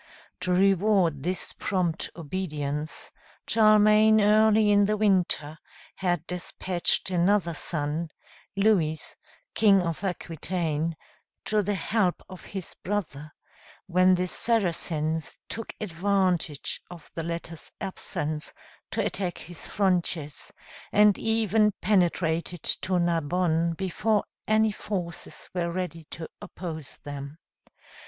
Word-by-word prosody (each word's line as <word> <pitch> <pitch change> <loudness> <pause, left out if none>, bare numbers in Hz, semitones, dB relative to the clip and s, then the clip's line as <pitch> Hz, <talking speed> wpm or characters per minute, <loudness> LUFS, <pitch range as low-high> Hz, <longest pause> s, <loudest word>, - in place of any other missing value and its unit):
To 180 0 -2
reward 190 -4 +3
this 180 +5 -1
prompt 180 -4 -1
obedience, 150 -3 -4 0.3
Charlemagne 215 0 +5
early 215 0 +5
in 205 0 +5
the 215 0 +1
winter 180 -7 +1 0.4
had 175 -3 0
despatched 180 +1 0
another 180 0 +2
son, 155 +1 -2 0.5
Louis, 190 -7 +2 0.5
King 200 -4 +5
of 165 +2 -3
Aquitaine, 165 -3 -2 0.5
to 215 -1 +2
the 205 +1 -1
help 190 -2 0
of 185 -1 -11
his 190 -3 -7
brother, 155 -7 -3 0.5
when 185 0 +4
the 180 0 0
Saracens 165 -7 0
took 225 - -5
advantage 185 -5 0
of 175 -3 -12
the 165 - -3
latter's 170 0 -5
absence 155 -6 -3 0.3
to - - -1
attack 180 -3 -2
his 175 0 -9
frontiers, 175 -6 0 0.4
and 210 -1 +6
even 220 -1 +2
penetrated 175 -4 +1
to 185 -1 +2
Narbonne 170 0 +1
before 195 +4 0 0.2
any 215 0 +3
forces 180 -5 -6
were 170 -2 -1
ready 170 -2 -4
to 160 -1 -7
oppose 160 -6 -7
them. 145 +1 -7
180 Hz, 105 wpm, -27 LUFS, 165-205 Hz, 0.5 s, and